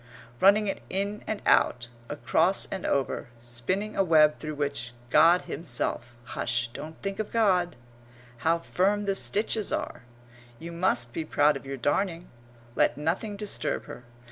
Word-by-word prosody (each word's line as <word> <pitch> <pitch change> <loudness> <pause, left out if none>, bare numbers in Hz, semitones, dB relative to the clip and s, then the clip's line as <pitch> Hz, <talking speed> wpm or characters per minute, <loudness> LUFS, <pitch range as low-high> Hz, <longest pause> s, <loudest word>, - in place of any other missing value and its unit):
Running 205 +2 +5
it 195 - -3
in 200 +2 -2
and 215 -1 -3
out, 120 -1 +3 0.2
across 165 +5 +1
and 190 - -3
over, 135 -2 -1
spinning 120 - -1
a 195 - +3
web 155 -3 +4
through 155 -1 -5
which 140 -4 -3 0.2
God 165 +5 +6
himself 120 -5 -3
hush, 120 0 -1
don't 155 +6 -9
think 195 +1 -3
of 215 - -2
God! 185 - +2 0.6
How 165 +7 +2
firm 200 +4 0
the 200 - +1
stitches 210 +2 0
are! - - -3 0.6
You 170 +5 -8
must 170 -9 0
be 165 - -2
proud 150 -1 +3
of 135 0 -8
your 135 0 -4
darning. 170 +6 -1 0.4
Let - - +2
nothing 180 +8 -2
disturb 210 -1 -2
her. 120 - -10
165 Hz, 150 wpm, -27 LUFS, 140-195 Hz, 0.6 s, God